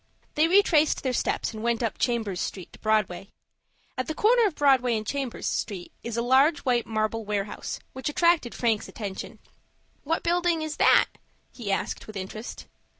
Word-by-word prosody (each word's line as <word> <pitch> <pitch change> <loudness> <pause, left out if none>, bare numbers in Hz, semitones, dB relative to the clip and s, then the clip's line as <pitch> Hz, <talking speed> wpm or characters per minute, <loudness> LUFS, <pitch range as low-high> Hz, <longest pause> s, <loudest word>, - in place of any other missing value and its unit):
They 310 +2 +3
retraced 335 -5 +4
their 260 -2 0
steps 240 - -1
and 215 - -7
went 235 +1 0
up 225 - -2
Chambers 220 -7 0
Street 185 -3 -5
to - - -14
Broadway. 200 -3 0 0.7
At 255 - -3
the 315 - -3
corner 460 +3 +4
of 355 - -5
Broadway 255 -5 +3
and 215 - -5
Chambers 270 0 -3
Street 195 -5 -3
is 235 -1 -5
a 235 - +1
large 270 +5 +4
white 245 -2 +1
marble 220 0 -1
warehouse, 205 -1 -3
which 260 +3 -3
attracted 335 -5 +2
Frank's 225 -3 0
attention. 200 -4 -6 0.7
"What 325 +3 -1
building 345 -1 +1
is 310 -1 -4
that?" - - +6 0.5
he 220 -5 -5
asked, 195 - -2
with 215 -2 -7
interest. 205 +4 -7
240 Hz, 170 wpm, -26 LUFS, 215-300 Hz, 0.7 s, that